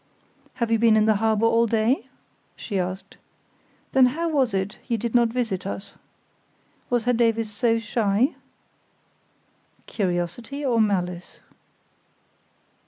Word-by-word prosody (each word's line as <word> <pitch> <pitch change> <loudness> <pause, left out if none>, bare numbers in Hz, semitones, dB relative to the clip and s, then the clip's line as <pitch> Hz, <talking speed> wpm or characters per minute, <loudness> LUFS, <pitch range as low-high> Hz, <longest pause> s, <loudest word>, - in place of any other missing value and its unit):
"Have 235 -2 -2
you 225 - +3
been 225 -1 +5
in 215 - +3
the 215 -2 +3
harbour 220 +1 +1
all 230 0 +3
day?" 230 +3 +1 0.5
she 200 -4 -4
asked, 185 +1 -5 0.7
"then 260 -1 +5
how 330 +6 -2
was 270 -6 +1
it 190 +1 -3
you 235 -3 0
did 230 +1 -4
not 240 -1 +4
visit 225 -6 -2
us? 195 0 -6 1.0
Was 240 -2 +1
Herr 245 +1 +2
Davies 225 -2 +1
so 230 +1 +1
shy?" 225 +2 +1 1.5
(Curiosity 200 - -3
or 235 -4 +2
malice?) 180 -4 -2
225 Hz, 125 wpm, -24 LUFS, 205-240 Hz, 1.5 s, been